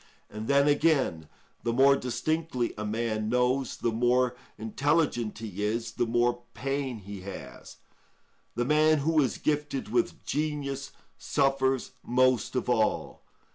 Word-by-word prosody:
And 110 +1 -6
then, 140 +1 +4
again, 145 - +2 0.3
the 115 - -1
more 135 +3 +5
distinctly 130 +1 -1
a 105 - -5
man 110 0 -1
knows, 125 +2 +1
the 115 - 0
more 125 +2 +2 0.2
intelligent 120 0 0
he 105 -3 -6
is, 115 +2 -1
the 120 - -1
more 120 +1 +1
pain 135 -2 -2
he 100 -1 -9
has; 95 0 -9 0.8
the 120 +1 0
man 155 +2 +4
who 160 -1 +4
is 130 - 0
gifted 145 -5 -1
with 120 +1 -1
genius 145 -2 -2 0.3
suffers 135 -2 +1
most 130 -1 +2
of 125 - -1
all. 110 -3 0
125 Hz, 135 wpm, -28 LUFS, 115-140 Hz, 0.8 s, more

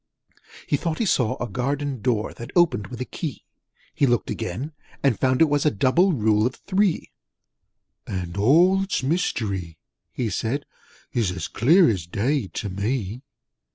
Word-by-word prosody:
He 145 - +1
thought 165 +1 -2
he 230 - 0
saw 125 - +1
a 120 - -2
Garden 135 +3 -2
Door 115 -3 0
That 120 - -9
opened 135 - +3
with 120 +3 -8
a - - -1
key: 150 -1 -6 0.5
He 140 - +2
looked 120 -2 +1
again, 125 - -4 0.3
and 135 -6 +2
found 130 +3 +3
it - - +6
was 145 -1 +1
A 150 - +4
Double 145 - +3
Rule 110 -3 +2
of 125 - -5
Three: 195 -2 0 1.0
'And 90 -2 -4
all 170 - +5
its 195 -7 -1
mystery,' 100 - -1 0.3
he 115 -4 -2
said, 130 +9 -2 0.5
'Is 95 -7 -1
clear 165 - +5
as 95 -7 -1
day 120 +6 0
to 100 - -5
me!' 105 +3 -2
125 Hz, 155 wpm, -24 LUFS, 105-145 Hz, 1.0 s, it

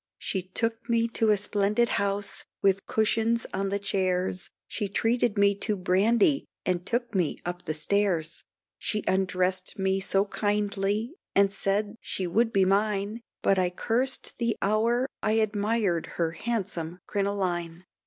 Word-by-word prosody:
She 190 - -2
took 225 +6 -2
me 230 0 +3
to 225 -1 +1
a 210 - +5
splendid 205 +3 +1
house, 200 0 -2 0.2
with 195 0 +2
cushions 225 +1 +2
on 195 +1 -1
the 200 - 0
chairs, 185 -2 -1 0.2
She 205 - -2
treated 225 +1 +1
me 200 0 +5
to 210 0 0
brandy 205 +9 +3 0.2
and 180 -1 0
took 240 0 -1
me 180 -6 +1
up 175 0 -4
the 155 - -2
stairs, 170 -1 0 0.4
She 210 -1 -1
undressed 185 0 0
me 190 0 +1
so 195 +1 +1
kindly, 205 +3 -1 0.2
and 200 0 +4
said 205 +1 0
she 185 - -2
would 225 +6 +2
be 195 -3 +4
mine; 205 +2 +1 0.2
But 195 -1 +4
I 180 -1 +2
cursed 245 +10 -1
the 235 -2 0
hour 230 +5 +2
I 215 - +1
admired 210 -4 +1
her 165 -2 +1
handsome 180 -4 -3
crinoline. 185 -4 -2
200 Hz, 145 wpm, -27 LUFS, 185-220 Hz, 0.4 s, a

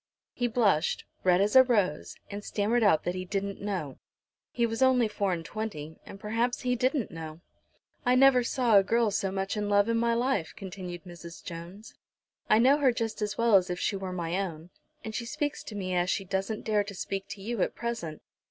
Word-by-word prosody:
He 245 - 0
blushed, 210 -9 +1 0.2
red 180 0 +4
as 205 +4 +1
a 260 - +11
rose, 205 - 0 0.2
and 205 +1 -6
stammered 220 +5 0
out 200 -8 +4
that 175 - -1
he 185 0 -4
"didn't 200 +1 -3
know." 185 -9 -4 0.5
He 235 - 0
was 225 +1 -3
only 255 -3 +4
four 200 -2 -1
and 165 -2 -3
twenty, 160 -8 -6
and 195 - -10
perhaps 230 +4 -1
he 250 -1 +1
didn't 255 -1 0
know. 160 -1 -8 0.6
"I 250 0 +3
never 265 -1 +6
saw 235 -4 +4
a - - +2
girl 230 +1 +2
so 195 0 0
much 195 +1 -2
in 205 -1 -2
love 205 +1 +4
in 230 - +2
my 235 0 +2
life," 235 -8 0
continued 180 -2 -7
Mrs. 170 -2 -11
Jones. 175 +5 -9 0.6
"I - - +6
know 265 +6 +5
her 270 -3 +4
just 225 -2 -3
as 210 -1 -2
well 230 -1 +2
as 185 -2 +5
if 180 0 -3
she 205 - 0
were 190 -1 -4
my 175 0 -2
own, 170 -2 -6 0.3
and 220 - -6
she 235 +1 -4
speaks 290 +4 -2
to 215 - -8
me 185 -2 -3
as 175 0 +1
she 195 +1 -1
doesn't 195 +3 -3
dare 210 -2 +2
to 200 0 -9
speak 195 +1 -4
to 200 - -8
you 230 -1 -2
at - - 0
present. 225 -10 -4
205 Hz, 215 wpm, -28 LUFS, 180-235 Hz, 0.6 s, a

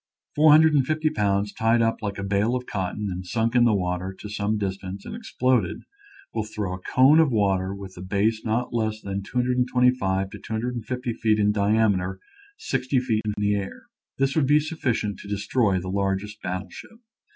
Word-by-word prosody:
Four 155 +1 +5
hundred 155 +1 +6
and 140 -3 +4
fifty 155 +3 0
pounds 100 0 0
tied 115 +1 +2
up 115 -1 +1
like 100 -2 -3
a 100 - -4
bale 100 +5 +1
of 125 0 -3
cotton 100 +1 -3
and 90 +1 -5
sunk 115 +5 -1
in 120 -1 +5
the 110 -3 +4
water 90 0 -2
to 105 - -8
some 105 +1 -1
distance 95 -1 -5
and - - -6
exploded 130 - 0 0.5
will 110 - -1
throw 105 -3 -4
a 95 - -6
cone 135 - +4
of 160 -4 +4
water 95 -4 +1
with 95 -1 -9
a - - -7
base 100 +4 0
not 115 +3 -1
less 110 -2 -1
than 100 -1 -4
225 125 -4 +1
to - - -9
250 120 +2 -3
feet 110 -1 +1
in 105 -1 +3
diameter 100 -3 +1 0.4
sixty 130 0 0
feet 115 -4 0
into 105 -1 -2
the 105 0 +2
air. 100 -1 -4 0.3
This 135 0 +1
would 150 -4 +2
be 150 +2 +5
sufficient 130 -10 -2
to 100 - -10
destroy 100 -1 +1
the 90 - -7
largest 100 +2 -2
battle 90 +1 -4
ship. 225 - -12
105 Hz, 190 wpm, -24 LUFS, 100-125 Hz, 0.5 s, hundred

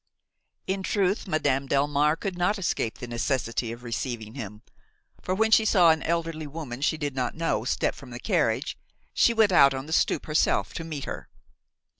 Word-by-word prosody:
In 190 +1 -2
truth 195 +1 0
Madame 140 -5 0
Delmare 145 +3 +2
could 195 -3 -3
not 180 +4 +1
escape 170 - -2
the - - -6
necessity 120 -1 -1
of 120 +1 -9
receiving 115 -1 -4
him, 105 -4 -8 0.6
for 185 - -2
when 220 +2 +2
she 220 - +6
saw 180 -6 +5
an 160 - 0
elderly 165 -2 -2
woman 140 -4 -7
she 160 - +1
did 145 -2 -3
not 125 -2 -2
know 165 +1 -1
step - - 0
from - - -12
the - - -7
carriage, - - 0 0.3
she - - +4
went 220 -3 +3
out 140 -6 +6
on 130 +1 -5
the 160 - -5
stoop - - +1
herself 150 0 +1
to 165 - -5
meet 155 -4 -5
her. - - -7
150 Hz, 185 wpm, -26 LUFS, 130-175 Hz, 0.6 s, she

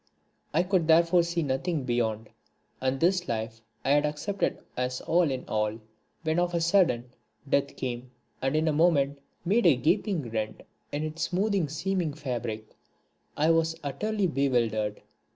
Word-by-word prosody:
I 165 +4 +3
could 180 -3 +1
therefore 170 +2 +5
see 170 0 -1
nothing 145 +3 -1
beyond, 115 -3 -1 0.5
and 130 +1 0
this 180 +2 +2
life 115 0 -3 0.2
I - - +3
had 145 0 +5
accepted 150 +7 -1 0.2
as 125 0 -2
all 170 -1 +2
in 130 -1 -3
all. 105 +1 -1 0.4
When 160 +1 +1
of 175 0 0
a - - +2
sudden 165 -9 +2 0.4
death 140 0 +1
came 125 -1 -4 0.3
and 135 +2 0
in 155 +1 +2
a 155 - +2
moment 145 -3 +3 0.3
made 205 +3 +4
a 155 - +6
gaping 160 - 0
rent 110 -1 -3 0.3
in 145 +1 -2
its 155 +1 -5
smooth 190 -3 +1
seeming 165 0 -1
fabric, 120 -7 -4 0.6
I 155 +2 +4
was 165 0 +1
utterly 210 +9 -1
bewildered. 115 - 0
150 Hz, 150 wpm, -28 LUFS, 125-170 Hz, 0.6 s, a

